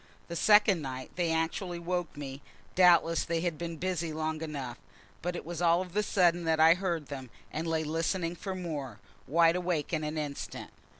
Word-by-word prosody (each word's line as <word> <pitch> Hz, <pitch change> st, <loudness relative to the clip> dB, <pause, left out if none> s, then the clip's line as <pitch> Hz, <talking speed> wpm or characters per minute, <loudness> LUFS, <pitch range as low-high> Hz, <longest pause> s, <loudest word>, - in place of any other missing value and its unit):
The 170 Hz, -, -4 dB
second 205 Hz, -1 st, +5 dB
night 130 Hz, -2 st, -6 dB
they 175 Hz, -2 st, 0 dB
actually 165 Hz, +3 st, -1 dB
woke 175 Hz, -2 st, -3 dB
me; 140 Hz, -1 st, -6 dB, 0.3 s
doubtless 170 Hz, -2 st, +5 dB
they 165 Hz, -1 st, -1 dB
had 175 Hz, -2 st, -1 dB
been 170 Hz, -1 st, -4 dB
busy 175 Hz, -2 st, -2 dB
long 155 Hz, 0 st, -2 dB
enough, 140 Hz, -6 st, -5 dB, 0.4 s
but 175 Hz, +1 st, -2 dB
it -, -, -6 dB
was 170 Hz, 0 st, -5 dB
all 170 Hz, 0 st, +4 dB
of 185 Hz, 0 st, -6 dB
a 210 Hz, -, +3 dB
sudden 175 Hz, -4 st, +2 dB
that 160 Hz, -1 st, +2 dB
I 160 Hz, +1 st, +8 dB
heard 175 Hz, -4 st, -2 dB
them, 135 Hz, -3 st, -6 dB, 0.2 s
and 160 Hz, +2 st, -2 dB
lay 160 Hz, -1 st, 0 dB
listening 165 Hz, +2 st, -1 dB
for 190 Hz, +2 st, -5 dB
more, 145 Hz, -, -5 dB, 0.3 s
wide 165 Hz, +3 st, +4 dB
awake 175 Hz, -4 st, -1 dB
in 155 Hz, -1 st, 0 dB
an 150 Hz, +1 st, -3 dB
instant. 145 Hz, -2 st, -5 dB
165 Hz, 190 wpm, -30 LUFS, 155-175 Hz, 0.4 s, I